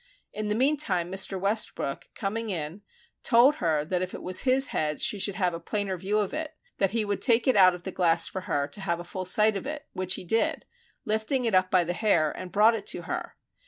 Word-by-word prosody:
In 215 0 -4
the 210 - 0
meantime 230 - 0
Mr. 190 0 +1
Westbrook 200 -8 -1
coming 225 +2 -3
in, 170 +1 -4 0.4
told 255 +5 +4
her 155 -3 0
that 180 +2 -1
if 185 0 -4
it - - -9
was 185 0 +2
his 265 +1 +3
head 150 -1 -2
she 205 - 0
should 195 0 0
have 180 -4 0
a 170 - -5
plainer 195 +2 -2
view 190 +4 -2
of 210 +4 -1
it, 310 0 -5 0.2
that 195 - +2
he 220 +1 -1
would 205 -1 -3
take 235 0 +3
it 260 - +4
out 185 -3 +6
of 175 - -12
the 190 - -5
glass 170 -2 +3
for 190 - -5
her 140 0 0
to 195 - -5
have 170 -3 -2
a - - -6
full 185 +1 -6
sight 210 +3 +3
of 195 - -5
it, 300 0 -6
which 185 -1 0
he - - -8
did, 225 +6 0 0.4
by 215 - -1
lifting 240 +4 0
it 225 - 0
up 185 0 +3
by 185 -2 +3
the 175 +1 -3
hair 175 -7 +2
and 185 -1 -8
brought 215 +3 +5
it 225 - -5
to - - -1
her. - - -5
195 Hz, 245 wpm, -27 LUFS, 180-220 Hz, 0.4 s, out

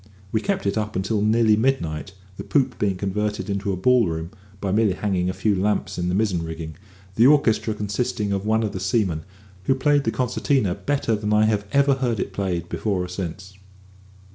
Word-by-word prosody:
We 110 - +1
kept 195 - -1
it 100 +2 +1
up 105 0 -4
until 95 +3 0
nearly 110 0 +4
midnight, 95 - -1 0.2
the - - -7
poop 130 -3 0
being 100 -2 +1
converted 105 +2 -2
into 100 0 -1
a - - -1
ball 120 +3 +4
room 80 +1 -4 0.3
by 100 -1 -2
merely 105 -1 +3
hanging 95 -2 -1
a - - +1
few 105 +1 +1
lamps 100 0 -1
in 90 0 -1
the 90 - 0
mizzen 100 -5 +1
rigging; 80 -1 -6 0.4
the 115 +6 +5
orchestra 115 -6 +3
consisting 105 0 -2
of 100 -1 -1
one 110 +1 +1
of 105 - -1
the 95 - -5
seamen, 95 -5 0 0.4
who 135 - +3
played 145 +1 +2
the - - +2
concertina 125 -3 0
better 115 +3 -1
than 105 0 -3
I 105 0 +4 0.2
ever 140 0 +4
heard 125 -5 -1
it - - -3
played 90 -4 -2
before 95 -1 -1
or - - -5
since. 95 +1 -6
105 Hz, 195 wpm, -23 LUFS, 95-115 Hz, 0.4 s, the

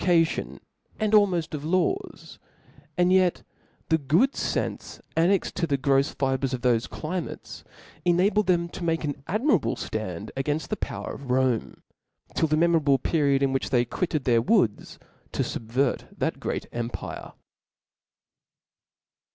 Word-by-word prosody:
cation, 170 -3 +1 0.4
and 215 -1 0
almoft 190 -7 +3
of 145 -2 -4
laws: 175 +3 -1 0.6
and 180 +1 +4
yet 185 -2 +3 0.5
the 160 0 +3
good 160 - +3
fenfe - - -3 0.2
annexed 175 +4 +2
to 170 - -1
the 140 -2 +1
grofs 135 +1 +2
fibres 135 -1 0
of 125 - -8
thofe 120 -2 +2
climates 170 +2 -5 0.4
enabled 185 +4 +3
them 170 -2 +2
to 170 - -8
make 165 -1 0
an 145 -2 -3
admirable 210 - +1
ftand 105 -2 -5
againft' 145 +3 -2
the 215 - 0
power - - -5
of 135 -2 -9
Rome, 125 -3 0 0.5
till 160 - +2
the 155 0 +1
memorable 160 -4 +4
pe 160 +5 -1
riod 140 -2 +3
in 135 -1 +2
which 135 - -1
they 125 -2 +3
quitted 155 +3 -2
their 120 -3 +3
woods - - +1 0.4
to - - 0
fubvert 125 +4 -1
that - - -1
great - - -3
empire. 120 0 -5
155 Hz, 145 wpm, -26 LUFS, 130-175 Hz, 0.6 s, and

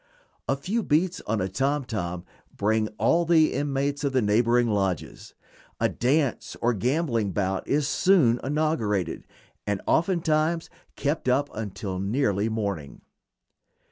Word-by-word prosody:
A 135 - +3
few 195 +12 -2
beats 175 +1 +1
on 110 -1 0
a 95 - 0
tom 135 +8 -1
tom 90 -7 -4 0.3
bring 110 +1 +1
all 170 - +3
the 165 -2 +4
inmates 140 +1 -1
of 140 -1 0
the 130 - +3
neighboring 120 +3 +3
lodges; 95 -5 -2 0.4
a - - +2
dance 125 -4 0
or 120 +1 +2
gambling 115 - 0
bout 95 -1 -1
is 145 -1 +1
soon 145 -9 +3
inaugurated, 130 - -1 0.4
and 100 -1 0
oftentimes 165 -1 +1 0.2
kept 145 -2 -1
up 140 +3 +1
until 100 -3 -5
nearly 105 0 0
morning. 100 -10 -4
125 Hz, 130 wpm, -26 LUFS, 105-150 Hz, 0.4 s, the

